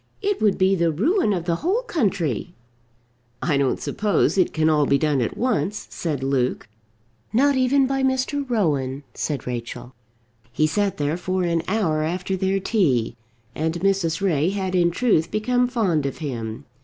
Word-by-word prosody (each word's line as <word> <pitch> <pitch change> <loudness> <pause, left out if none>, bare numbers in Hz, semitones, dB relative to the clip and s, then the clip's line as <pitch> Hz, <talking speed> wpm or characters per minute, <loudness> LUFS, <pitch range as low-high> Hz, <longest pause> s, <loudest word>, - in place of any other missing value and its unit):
It 410 0 0
would 210 -3 +3
be 190 +1 +3
the 170 -3 +2
ruin 245 - +1
of 175 -4 -1
the 170 -1 0
whole 395 - 0
country." 185 - -1 0.8
"I 155 +1 0
don't 140 -2 +1
suppose 210 -1 +1
it 185 -2 +2
can 160 - -1 0.3
be 140 - +4
done 145 -1 +1
all - - +2
at - - -6
once," 210 - -1
said 150 -6 -3
Luke. 130 -5 0 0.6
"Not 280 +4 +3
even 260 +1 +3
by 270 +1 -1
Mr. 265 +2 0
Rowan," 145 - 0
said 145 -5 -3
Rachel. 125 +1 -6 0.6
He 155 +6 +1
sat 200 +5 0
there 145 +3 -1
for 185 +1 -1
an 170 -1 +1
hour 185 -7 +1
after 180 +4 -2
their 190 +1 0
tea, 145 - +1 0.4
and 160 +2 -2
Mrs. 190 -3 +1
Ray 165 -4 +2
had 190 -1 -2
in 175 -2 +3
truth 170 -4 +1
become 245 +3 +1
fond 190 - 0
of 135 - -5
him. 115 -7 -5
180 Hz, 170 wpm, -23 LUFS, 150-215 Hz, 0.8 s, be